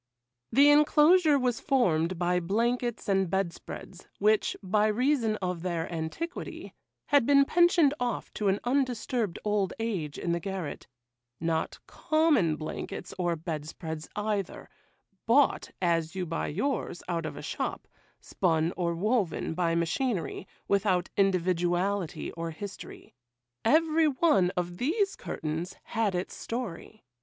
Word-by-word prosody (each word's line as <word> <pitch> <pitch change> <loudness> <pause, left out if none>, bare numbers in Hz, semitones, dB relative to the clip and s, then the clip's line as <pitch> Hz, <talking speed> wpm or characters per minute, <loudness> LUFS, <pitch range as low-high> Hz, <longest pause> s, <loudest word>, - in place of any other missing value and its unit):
The 285 +2 +6
enclosure 300 +2 +5
was 250 -3 0
formed 185 - +1
by 180 +1 +1
blankets 235 +6 -1
and 195 -2 +2
bed 190 -1 0
spreads, 180 +1 -10
which, 210 +1 +2
by 210 +3 +2
reason 235 0 +1
of 180 -2 -2
their 170 -2 -2
antiquity, 165 - -5 0.4
had 285 -5 +4
been 280 -1 +6
pensioned 345 -3 +4
off 245 -1 -3
to 210 - -1
an 195 +1 +2
undisturbed 245 -5 0
old 205 -2 +1
age 190 -11 -3
in 175 - -2
the 170 - 0
garret,—not 145 -4 -5
common 300 - +2
blankets 155 +3 -6
or 175 -1 +1
bed 155 -2 -5
spreads, 160 -1 -6
either,—bought, 210 +4 -1
as 170 -1 0
you 185 -1 -2
buy 165 0 -2
yours, 205 - -2
out 165 -3 -2
of 145 - -7
a - - -7
shop,—spun 165 -1 -2
or 170 -2 -1
woven 200 -3 0
by 170 -1 0
machinery,—without 190 - -1
individuality 185 -1 0
or 165 0 -5
history. 195 +5 -9 0.5
Every 315 +4 +4
one 270 - +3
of 175 0 -2
these 390 - 0
curtains 160 +4 -4
had 215 -4 -1
its 180 +1 -3
story. 225 -3 -6
195 Hz, 125 wpm, -28 LUFS, 170-245 Hz, 0.5 s, The